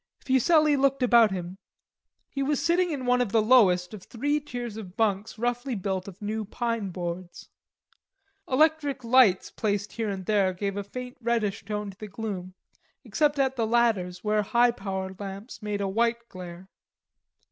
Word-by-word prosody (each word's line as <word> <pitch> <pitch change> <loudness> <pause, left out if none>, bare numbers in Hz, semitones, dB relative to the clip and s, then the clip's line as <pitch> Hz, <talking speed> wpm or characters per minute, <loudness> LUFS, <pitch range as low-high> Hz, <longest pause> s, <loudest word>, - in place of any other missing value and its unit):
Fuselli 295 +3 +3
looked 275 -1 +2
about 235 -3 +6
him. 185 0 -5 0.7
He 275 - -4
was 285 +1 +1
sitting 355 +1 +2
in 280 -5 -3
one 250 0 +3
of 235 -5 -1
the 225 - +4
lowest 210 -6 +4
of 210 - -8
three 290 +9 -1
tiers 245 -6 -6
of 195 -4 -9
bunks 210 -1 0
roughly 245 +2 -1
built 190 -1 -3
of 195 -2 -10
new 215 +1 -2
pine 230 -1 -2
boards. 175 0 -6 1.0
Electric 290 -1 +2
lights 230 -6 +4
placed 205 -1 -2
here 225 -2 -2
and 190 -2 -5
there 195 -3 +2
gave 200 +2 -3
a 205 - -3
faint 250 +5 -8
reddish 225 -3 -1
tone 210 -1 -4
to 190 - -19
the 215 - -6
gloom, 195 -3 -6 0.5
except 295 -2 +1
at 265 -1 +1
the 225 -2 +1
ladders, 215 -7 +1
where 210 0 +2
high 240 +4 +3
power 190 -4 -4
lamps 200 +4 -8
made 210 -1 -3
a 200 - 0
white 235 +3 0
glare. 180 0 -9
220 Hz, 170 wpm, -27 LUFS, 195-250 Hz, 1.0 s, about